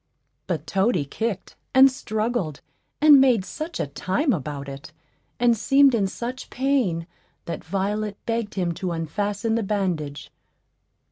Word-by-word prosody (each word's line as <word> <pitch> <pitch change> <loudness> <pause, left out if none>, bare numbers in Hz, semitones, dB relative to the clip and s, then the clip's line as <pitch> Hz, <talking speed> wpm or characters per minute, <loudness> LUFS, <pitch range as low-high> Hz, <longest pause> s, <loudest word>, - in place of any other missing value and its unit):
But 160 -5 -2
Toady 190 -3 +1
kicked, 210 +6 -4 0.2
and 265 +1 +8
struggled, 215 - -2 0.4
and 295 -3 +8
made 245 -8 +3
such 320 +9 -6
a - - 0
time 190 - 0
about 145 -3 -4
it, 140 +2 -9 0.5
and 240 -1 +4
seemed 270 +5 +4
in 205 -4 +2
such 245 +6 -6
pain, 245 -11 0 0.4
that 170 - -5
Violet 200 +3 -2
begged 230 -2 -2
him 180 -3 0
to 180 +1 -3
unfasten 205 +7 -2
the 230 - +1
bandage. 180 -9 -2
205 Hz, 135 wpm, -24 LUFS, 170-240 Hz, 0.5 s, and